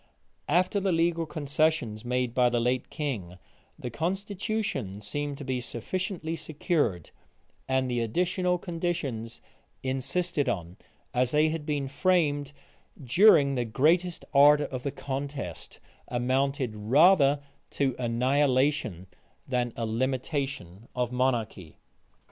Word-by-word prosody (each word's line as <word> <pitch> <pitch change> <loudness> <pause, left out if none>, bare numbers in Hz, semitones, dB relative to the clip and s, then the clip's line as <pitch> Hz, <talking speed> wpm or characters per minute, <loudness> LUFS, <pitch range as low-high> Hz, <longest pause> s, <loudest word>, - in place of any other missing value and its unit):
After 185 +3 +2
the 195 -1 0
legal 165 0 +1
concessions 145 -7 0
made 125 -1 -1
by 125 0 +4
the 120 0 +1
late 125 +2 0
king, 110 - -4 0.4
the 125 - -6
constitution 190 - -2
seemed 145 +6 -4
to 145 - -7
be 130 -2 -1
sufficiently 165 - -4
secured; 150 - -1 0.6
and 130 0 +2
the 120 -1 -1
additional 180 - 0
conditions 165 - -4 0.4
insisted 135 +4 -1
on, 85 0 -4 0.4
as 125 0 +2
they 150 +3 +3
had 160 -1 -4
been 145 -2 -1
framed 145 -2 +1 0.5
during 140 - +6
the 125 -2 0
greatest 165 +10 +1
ardor 145 +1 +6
of 130 -2 -5
the 140 - -2
contest, 140 - -5 0.3
amounted 130 0 0
rather 140 - +5 0.3
to 135 -3 0
annihilation 130 - +1 0.4
than 125 -2 0
a 115 - -2
limitation 130 - -3
of 125 -1 -1
monarchy. 115 - -1
135 Hz, 115 wpm, -28 LUFS, 120-160 Hz, 0.6 s, during